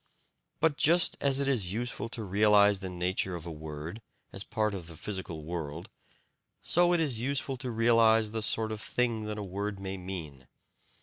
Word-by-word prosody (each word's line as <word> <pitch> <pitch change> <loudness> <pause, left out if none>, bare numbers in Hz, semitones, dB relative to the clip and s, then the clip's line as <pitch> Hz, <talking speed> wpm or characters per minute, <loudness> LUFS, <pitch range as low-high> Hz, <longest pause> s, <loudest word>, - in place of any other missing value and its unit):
But 160 -3 +2
just 170 +3 +4
as 140 -1 +2
it 140 - 0
is 105 -9 +1
useful 120 0 -3
to 115 -1 -5
realize 105 0 +4
the 95 -1 -5
nature 90 +1 -1
of 85 -1 -7
a 85 - -5
word 80 +5 -7 0.3
as 95 - -5
part 110 0 -1
of 90 -4 -6
the 85 -2 -10
physical 95 -6 -5
world, 80 -1 -5 0.7
so 175 +1 +4
it 175 - +3
is 140 -8 0
useful 135 +2 -1
to 125 0 -5
realize 115 -1 +4
the 110 0 -3
sort 110 0 +2
of 110 -1 -4
thing 115 -3 0
that 105 0 -4
a 105 - -4
word 100 +1 -4
may 95 0 -4
mean. 80 -8 -7
105 Hz, 185 wpm, -30 LUFS, 90-115 Hz, 0.7 s, just